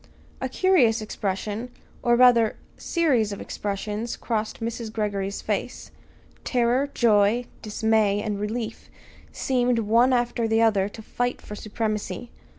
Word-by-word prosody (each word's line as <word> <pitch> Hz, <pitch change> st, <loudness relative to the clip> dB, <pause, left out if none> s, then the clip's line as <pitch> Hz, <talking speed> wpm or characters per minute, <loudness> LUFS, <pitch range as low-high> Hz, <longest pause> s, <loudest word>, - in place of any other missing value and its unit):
A 260 Hz, -, -2 dB
curious 260 Hz, -, +3 dB
expression, 210 Hz, +2 st, -3 dB, 0.3 s
or 240 Hz, -1 st, +3 dB
rather, 235 Hz, -3 st, +5 dB, 0.2 s
series 265 Hz, -, +1 dB
of 200 Hz, -, -5 dB
expressions 210 Hz, +3 st, -4 dB
crossed 220 Hz, -2 st, -3 dB
Mrs. 230 Hz, -1 st, -4 dB
Greggory's 200 Hz, -2 st, -2 dB
face. -, -, -3 dB, 0.5 s
Terror, 250 Hz, +3 st, +1 dB
joy, 225 Hz, -1 st, +3 dB, 0.2 s
dismay, 215 Hz, -1 st, +1 dB
and 210 Hz, -1 st, -3 dB
relief 220 Hz, +2 st, -4 dB, 0.4 s
seemed, 250 Hz, -2 st, +1 dB
one 230 Hz, +4 st, +3 dB
after 240 Hz, -2 st, +1 dB
the 225 Hz, 0 st, +2 dB
other 210 Hz, -4 st, +3 dB
to 220 Hz, +1 st, -11 dB
fight 245 Hz, +3 st, -2 dB
for -, -, -10 dB
supremacy. 215 Hz, +2 st, -3 dB
225 Hz, 125 wpm, -25 LUFS, 210-245 Hz, 0.5 s, rather